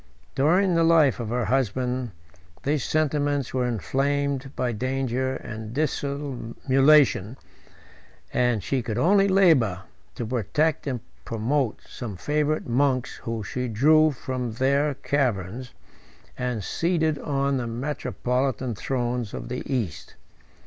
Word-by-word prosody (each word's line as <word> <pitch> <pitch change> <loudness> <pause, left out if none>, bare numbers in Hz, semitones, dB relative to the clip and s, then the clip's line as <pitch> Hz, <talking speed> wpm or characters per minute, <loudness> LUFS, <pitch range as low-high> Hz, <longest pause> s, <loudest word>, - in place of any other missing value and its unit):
During 175 +7 +3
the 165 0 +3
life 160 -6 +4
of 115 -3 -4
her 120 0 0
husband, 125 0 0 0.5
these 145 -2 0
sentiments 145 -3 0
were 125 -1 +1
inflamed 135 +3 -1
by 125 -1 0
danger 130 +2 -1
and 110 0 -7
dissimulation, 140 -4 +2 1.0
and 120 -5 +1
she 135 +3 0
could 115 -2 -4
only 195 +3 +4
labor 155 - +4 0.3
to 120 - -4
protect 130 +8 0
and 125 -4 -2 0.2
promote 115 +2 -1
some 110 -7 -7
favorite 150 +7 0
monks 130 +1 +1
whom 115 -2 -4
she 125 +4 -3
drew 155 +8 +5
from 130 -4 -4
their 140 +4 +1
caverns, 125 -4 -1 0.6
and 125 -4 -2
seated 160 - 0
on 140 -1 0
the 120 -2 -2
metropolitan 130 -1 -2
thrones 120 0 -2
of - - -6
the 125 - -3
East. 115 - -3
130 Hz, 120 wpm, -25 LUFS, 120-145 Hz, 1.0 s, drew